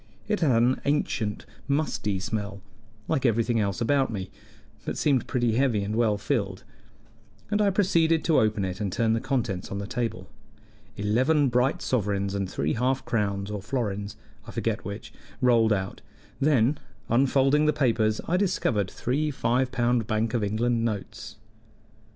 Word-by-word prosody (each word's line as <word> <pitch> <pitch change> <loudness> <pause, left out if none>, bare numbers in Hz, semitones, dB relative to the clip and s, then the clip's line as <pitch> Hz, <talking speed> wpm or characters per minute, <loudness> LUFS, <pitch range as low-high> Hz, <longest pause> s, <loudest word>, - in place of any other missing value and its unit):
It 210 -1 0
had 125 -8 +3
an 125 +2 +2
ancient, 115 -7 -1 0.2
musty 140 -9 0
smell, 100 -1 -4 0.4
like 135 - 0
everything 115 -1 +2
else 100 0 -1
about 135 +1 +2
me, 95 -3 -5 0.5
but - - -4
seemed 140 -5 +1
pretty 120 -3 +1
heavy 115 -3 +1
and 105 +2 -3
well 110 -3 +2
filled, 100 -5 -2 0.9
and 210 0 +2
I 205 - +4
proceeded 170 -5 +2
to 160 - +4
open 105 -2 +1
it 95 +2 -5
and 100 -2 -1
turn 115 +3 +1
the 115 - 0
contents 120 -9 -2
on 100 - -4
the 100 - -4
table. 115 -5 -3 0.7
Eleven 130 +8 +2
bright 125 +3 +1
sovereigns 100 -5 0
and 100 -2 -2
three 75 -3 -1
half 130 +3 0
crowns 100 -2 -1
or 105 -1 -4
florins, 105 -3 -3 0.3
I - - -8
forget - - -2
which, - - -7 0.3
rolled 115 -3 +4
out; 95 -2 -2 0.4
then, 140 -1 +3 0.3
unfolding 135 +4 +3
the - - +5
papers, 115 -7 +1
I 180 - +2
discovered 120 - 0
three 145 +5 -1
five 130 -1 0
pound 120 -3 +1
Bank 110 +1 0
of 120 -3 0
England 115 +3 0
notes. 105 -4 -4
115 Hz, 155 wpm, -26 LUFS, 105-135 Hz, 0.9 s, the